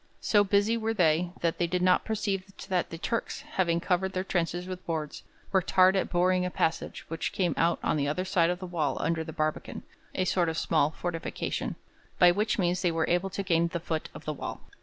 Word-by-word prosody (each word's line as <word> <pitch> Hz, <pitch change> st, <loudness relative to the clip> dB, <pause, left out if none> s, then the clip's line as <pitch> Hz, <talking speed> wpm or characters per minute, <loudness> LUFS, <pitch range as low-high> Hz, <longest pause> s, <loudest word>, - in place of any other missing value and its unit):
So 205 Hz, -1 st, +4 dB
busy 205 Hz, +3 st, +2 dB
were 225 Hz, 0 st, -1 dB
they, 170 Hz, -2 st, +3 dB
that 170 Hz, -1 st, 0 dB
they 175 Hz, -, +2 dB
did 180 Hz, +1 st, -1 dB
not 180 Hz, 0 st, +4 dB
perceive 200 Hz, -3 st, -2 dB, 0.2 s
that 180 Hz, -2 st, 0 dB
the 165 Hz, -, -6 dB
Turks, 230 Hz, +7 st, -2 dB
having 170 Hz, -3 st, 0 dB
covered 190 Hz, +2 st, 0 dB
their 185 Hz, -, -1 dB
trenches 175 Hz, -1 st, -1 dB
with 185 Hz, 0 st, -6 dB
boards, 155 Hz, -3 st, -3 dB, 0.3 s
worked 190 Hz, -2 st, +1 dB
hard 185 Hz, 0 st, +5 dB
at 190 Hz, -, 0 dB
boring 180 Hz, +1 st, +2 dB
a 180 Hz, -, -1 dB
passage 165 Hz, -2 st, -2 dB
which 165 Hz, 0 st, -3 dB
came 175 Hz, -5 st, 0 dB
out 170 Hz, +1 st, +2 dB
on -, -, +1 dB
the 140 Hz, -1 st, 0 dB
other 180 Hz, +6 st, -1 dB
side 175 Hz, -3 st, +3 dB
of 180 Hz, -, 0 dB
the 185 Hz, -, -7 dB
wall 165 Hz, -5 st, -1 dB
under 160 Hz, +1 st, 0 dB
the 160 Hz, -, -7 dB
barbican 155 Hz, 0 st, -3 dB, 0.3 s
a 185 Hz, -, +1 dB
sort 175 Hz, -2 st, +2 dB
of 160 Hz, -, -3 dB
small 155 Hz, -3 st, +2 dB
fortification 165 Hz, +1 st, -3 dB, 0.4 s
by 175 Hz, -1 st, +7 dB
which 210 Hz, +4 st, 0 dB
means 180 Hz, -2 st, +1 dB
they 175 Hz, -, +2 dB
were 165 Hz, -1 st, 0 dB
able 180 Hz, +2 st, +1 dB
to 200 Hz, +1 st, -3 dB
gain 170 Hz, -2 st, +2 dB
the 170 Hz, 0 st, -3 dB
foot 160 Hz, -1 st, -3 dB
of -, -, -10 dB
the 155 Hz, -, -2 dB
wall. -, -, -6 dB
175 Hz, 225 wpm, -28 LUFS, 165-190 Hz, 0.4 s, by